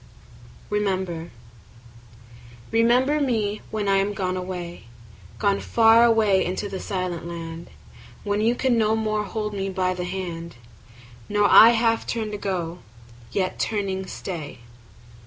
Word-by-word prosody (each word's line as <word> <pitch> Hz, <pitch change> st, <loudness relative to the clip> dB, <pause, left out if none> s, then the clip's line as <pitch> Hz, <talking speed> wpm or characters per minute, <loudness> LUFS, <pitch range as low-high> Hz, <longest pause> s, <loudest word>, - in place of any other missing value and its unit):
Remember 190 Hz, -5 st, -1 dB, 1.4 s
REMEMBER 250 Hz, +6 st, +3 dB
me 215 Hz, -6 st, 0 dB
when 215 Hz, -2 st, -3 dB
I 195 Hz, 0 st, +3 dB
am 200 Hz, +1 st, 0 dB
gone 185 Hz, -1 st, -1 dB
away, 180 Hz, -6 st, -6 dB, 0.5 s
Gone 200 Hz, -1 st, +1 dB
far 225 Hz, 0 st, +5 dB
away 220 Hz, -5 st, +4 dB
into 185 Hz, +3 st, -3 dB
the 195 Hz, -1 st, -5 dB
silent 180 Hz, -4 st, -4 dB
land; 165 Hz, -1 st, -7 dB, 0.5 s
When 205 Hz, 0 st, -1 dB
you 230 Hz, +3 st, +2 dB
can 245 Hz, -2 st, +1 dB
no 220 Hz, 0 st, +2 dB
more 215 Hz, -1 st, -1 dB
hold 210 Hz, +1 st, -4 dB
me 195 Hz, -1 st, -3 dB
by 185 Hz, -1 st, 0 dB
the 180 Hz, -1 st, -4 dB
hand, 175 Hz, -4 st, -5 dB, 0.7 s
Nor 205 Hz, 0 st, +3 dB
I 225 Hz, -, +10 dB
half 225 Hz, 0 st, +1 dB
turn 220 Hz, -3 st, -2 dB
to 210 Hz, -, -4 dB
go, 180 Hz, -3 st, -3 dB, 0.5 s
yet 185 Hz, -1 st, -2 dB
turning 195 Hz, -3 st, -2 dB
stay. 155 Hz, -9 st, -7 dB
200 Hz, 135 wpm, -24 LUFS, 185-220 Hz, 1.4 s, I